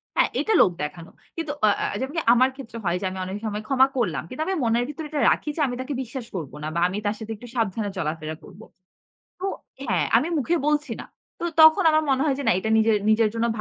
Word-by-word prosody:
হ্যাঁ, - - +3
এটা 440 - +1
লোক 180 - +5
দেখানো। 165 +3 -7 0.2
কিন্তু 325 -3 -3
অ - - +5
এ্যাঁ - - -2
যেমনকি 290 +5 -2
আমার 255 +2 +4
ক্ষেত্রে 235 -4 -9
হয় 175 +1 +1
যে, - - -2
আমি 190 - -6
অনেক 190 +2 -4
সময় 210 0 -3
ক্ষমা 265 -1 +5
করলাম। 175 - 0
কিন্তু 260 - -6
আমি 385 - 0
মনের 235 +1 +2
ভিতরে 300 +1 -6
এটা 305 - -2
রাখি 300 - -1
যে, 320 - -2
আমি 245 - -3
তাকে 280 +2 -4
বিশ্বাস 250 0 -7
করব 155 -7 -4
না। 155 - -2
বা 170 - +1
আমি 190 - -4
তার 205 +1 0
সাথে 220 0 -7
একটু 245 +4 -12
সাবধানে 220 -2 -1
চলাফেরা 155 -2 -3
করব। 200 - -14 0.8
তো - - -5 0.4
হ্যাঁ, - - +1
আমি 320 - +2
মুখে 330 +6 +1
বলছি 300 0 0
না। - - -9 0.3
তো - - -3 0.2
তখন 315 +5 +8
আমার 310 0 +3
মনে 265 0 +2
হয় 280 -3 +1
যে 285 - -2
না - - +6
এটা 220 +3 -2
নিজের 220 -1 +4
নিজের 220 0 +4
জন্য 230 +1 +1
230 Hz, 240 wpm, -24 LUFS, 200-285 Hz, 0.8 s, তখন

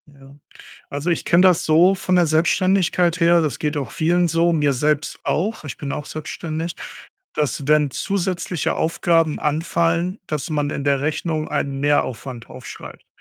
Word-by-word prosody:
Ja. 140 -1 -17 0.6
Also, 145 +5 -2
ich 170 - -1
kenne 170 +1 +4
das 180 -2 +4
so 170 +5 +5
von 185 -1 0
der 175 -1 +4
Selbstständigkeit 175 +2 +2
her, 170 0 +5
das 155 -3 -2
geht 150 0 -2
auch 135 -5 -3
vielen 175 +2 +1
so, 165 +1 +2
mir 150 -3 +2
selbst 150 +3 0
auch, 200 +3 -1
ich 145 - -6
bin 140 - -5
auch 150 - -4
selbstständig, 160 +2 -5 0.6
dass 145 -2 -2
wenn 150 -1 +3
zusätzliche 180 0 -2
Aufgaben 165 -1 +1
anfallen, 165 +4 0
dass 150 +1 -4
man 145 -1 -1
in 140 - -4
der 140 -1 +2
Rechnung 155 +1 -2
einen 135 -1 -2
Mehraufwand 130 -4 -1
aufschreibt - - -11
160 Hz, 160 wpm, -21 LUFS, 145-170 Hz, 0.6 s, so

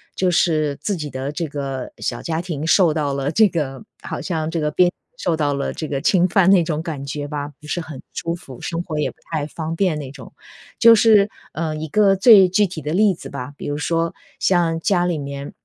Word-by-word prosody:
就 185 -1 +1
是 155 -4 +2
自 205 - -1
己 150 -4 -5
的 130 +2 -4
这 165 +3 -3
个 135 -3 -5
小 120 - -3
家 165 0 -2
庭 160 -4 -4
受 170 0 +4
到 150 -3 -1
了 140 0 -1
这 215 +4 +5
个 145 -6 -3 0.2
好 - - -5
像 160 -4 -2
这 165 0 -2
个 150 0 0
边 180 +4 +4
界 - - -15 0.2
受 470 - 0
到 145 -2 0
了 140 0 -2
这 155 - -5
个 140 - -1
侵 180 +2 +3
犯 190 0 +3
那 190 -3 +6
种 155 -1 -2
感 155 -5 -5
觉 145 +1 -4
吧， 145 -1 -4
不 150 - -13
是 175 - -2
很 155 -5 -9
舒 170 - -3
服， 135 -8 -12
生 165 0 -3
活 160 -3 -5
也 150 - 0
不 - - -29 0.2
太 155 -3 -1
方 160 +1 -5
便 180 -3 +1
那 140 -3 -6
种。 - - -12 0.5
就 230 0 +8
是， 215 -2 +5 0.2
呃， 160 -1 -2
一 155 +1 -5
个 200 +3 +4
最 200 -2 +8
具 205 +3 +3
体 175 -3 -7
的 150 +1 -4
例 205 +1 +4
子 - - -10
吧， 140 -1 -6
比 - - -7
如 145 0 -2
说 165 +2 -1 0.3
像 170 -3 +2
家 175 +1 +1
里 175 -2 0
面。 140 -1 -6
160 Hz, 255 characters per minute, -21 LUFS, 145-180 Hz, 0.5 s, 就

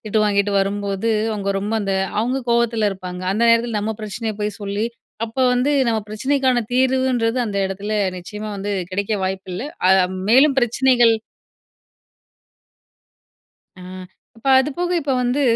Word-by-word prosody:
திட்டு 215 +1 0
வாங்கிட்டு 200 0 +1
வரும்போது, 200 +1 -2 0.2
அவங்க 200 -2 -2
ரொம்ப 205 +3 -3
அந்த 195 -1 -2 0.3
அவங்க 250 +4 0
கோவத்தில 235 -2 +2
இருப்பாங்க, 180 -2 -7
அந்த 215 +4 0
நேரத்தில 230 -1 +2
நம்ம 220 +2 -2
பிரச்சனையை 215 +1 -4
போய் 210 0 -2
சொல்லி, 200 +1 -2 0.4
அப்போ 230 +4 -2
வந்து 250 +4 +1 0.2
நம்ம 225 -1 +1
பிரச்சனைக்கான 260 +2 +1
தீர்வுன்றது 255 -2 +1
அந்த 205 -2 -4
இடத்துல 200 +3 -5 0.3
நிச்சயமா 210 +4 -7
வந்து 200 +1 -4 0.2
கிடைக்க 200 +3 -2
வாய்ப்பு 190 0 -4
இல்ல. 185 - -4 0.3
அ - - +6 0.4
மேலும் 270 +3 +6
பிரச்சனைகள் 240 -1 +4 2.7
ஆ. - - -10 0.5
இப்போ 240 +4 -4
அது 265 +3 +1
போக 355 0 -1
இப்போ 280 -3 -1
வந்து, 250 +3 0
220 Hz, 140 wpm, -20 LUFS, 200-250 Hz, 2.7 s, அ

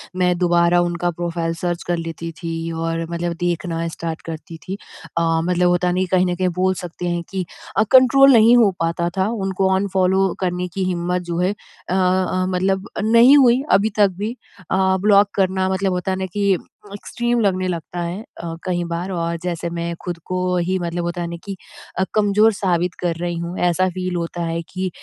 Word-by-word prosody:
मैं 180 -1 +2
दोबारा 175 0 +3
उनका 175 0 -1
प्रोफाइल 170 0 -3
सर्च 175 -1 -2
कर 175 0 0
लेती 165 0 -5
थी 165 -1 -4
और 165 0 -2
मतलब 170 0 -2
देखना 170 -1 -2
स्टार्ट 165 0 -5
करती 165 +1 -7
थी। 190 - -3 0.4
अ, - - +3 0.2
मतलब 180 +1 +2
होता 175 0 +1
है 180 - +1
न - - -1
कि 185 - +2
कहीं 185 -1 +4
न 180 -1 -1
कहीं 185 +1 0
बोल 185 0 +3
सकते 175 0 -5
हैं 175 0 -1
कि 190 -2 -3 0.3
अ, - - +5
कंट्रोल 270 +1 +7
नहीं 230 +1 +7
हो 220 -5 +5
पाता 165 +1 0
था, 190 +1 +2
उनको 195 -3 0
अनफॉलो 190 -1 +1
करने 180 -1 -1
की 195 - -2
हिम्मत 180 0 -1
जो 170 - -2
है 180 +2 +2
अ 205 -3 -9
अ, 185 0 +1
मतलब 190 +1 0
अ, - - -1
नहीं 235 +6 +7
हुई 255 -2 +5
अभी 210 +2 +4
तक 205 -1 +6
भी। 215 +4 -3 0.4
अ, 190 0 +2
ब्लॉक 205 0 +5
करना 190 -1 +1
मतलब 190 0 0
होता 180 +1 -2
है 185 - -1
न - - -2
कि 200 -2 +2 0.4
एक्सट्रीम 240 +4 -2
लगने 185 -3 +1
लगता 175 0 -4
है 175 +4 -4
अ, 170 -6 -8
कहीं 175 -1 -1
बार, 170 +3 -4
और 170 -1 -2
जैसे 170 -1 -3
मैं 170 0 -3
खुद 175 -1 -4
को 185 - -3 0.2
ही 180 +2 0
मतलब 175 0 -3
होता 175 +1 -3
है 170 - -2
न - - -5
कि 200 -1 -6 0.4
अ, 190 - +2
कमज़ोर 210 +1 +4
साबित 180 -2 0
कर 175 -2 -1
रही 175 +1 -3
हूँ। 170 +2 -5
ऐसा 180 +1 +2
फ़ील 185 0 -4
होता 170 0 -3
है 165 0 -2
कि 185 0 -3
180 Hz, 205 wpm, -20 LUFS, 170-190 Hz, 0.4 s, कंट्रोल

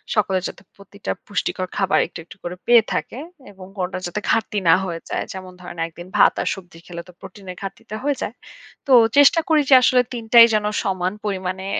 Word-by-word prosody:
সকলে 195 -3 +1
যাতে - - -10
প্রতিটা 200 +1 -8 0.2
পুষ্টিকর 185 -2 -2
খাবার 195 -1 +2
একটু, 175 - -10
একটু 175 - -15
করে 175 +1 -5
পেয়ে 240 -2 +6
থাকে - - -4 0.3
এবং 190 -2 -13
কোনটার 185 0 -3
যাতে 175 +4 -4
ঘাটতি 220 -2 0
না - - +8
হয়ে 170 -2 -5
যায়। - - -2
যেমন 185 -1 -9
ধরেন, 175 -1 -10
একদিন 175 +2 -12
ভাত - - +6
আর - - -3
সবজি 175 -3 -14
খেলে 170 -1 -7
তো - - -13
প্রোটিনের 190 -2 -10
ঘাটতিটা 210 +2 -8
হয়ে 290 0 0
যায়। 215 - -4 0.5
তো - - -1 0.3
চেষ্টা 285 +3 +6
করি 310 -2 +4
যে - - +6
আসলে 250 0 +4
৩ 235 -2 -5
টাই 235 -1 +10
যেন 210 -1 +1 0.2
সমান 185 -1 -1
পরিমাণে 190 -1 -3
195 Hz, 200 wpm, -21 LUFS, 180-220 Hz, 0.5 s, টাই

